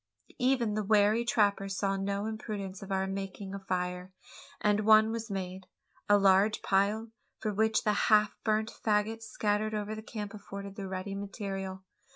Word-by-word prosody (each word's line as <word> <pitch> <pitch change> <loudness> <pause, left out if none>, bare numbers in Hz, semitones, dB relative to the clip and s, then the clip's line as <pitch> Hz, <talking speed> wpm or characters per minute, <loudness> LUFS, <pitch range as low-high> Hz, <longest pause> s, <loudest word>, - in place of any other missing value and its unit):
Even 250 -4 +2
the 215 0 -1
wary 210 +2 +4
trapper 205 -4 +2
saw 195 0 0
no 200 +1 -2
imprudence 210 -3 -5
in 195 0 -8
our 190 0 +1
making 195 0 -5
a 200 - -4
fire, 180 -1 -3 0.5
and 210 0 +2
one 215 +1 +6
was 230 0 -4
made 190 -1 -5 0.4
a 205 - +7
large 195 +2 +4
pile, 205 +3 +1 0.3
for 215 - -2
which 220 +2 +2
the 210 - +2 0.2
half 210 -1 +5
burnt 220 0 +1
faggots 220 +1 +1
scattered 215 0 -1
over 210 0 -3
the 215 - -6
camp 210 -2 -6
afforded 200 -1 -8
the 195 -1 -5
ready 190 +1 -4
material. 195 -1 -5
205 Hz, 165 wpm, -30 LUFS, 195-215 Hz, 0.5 s, a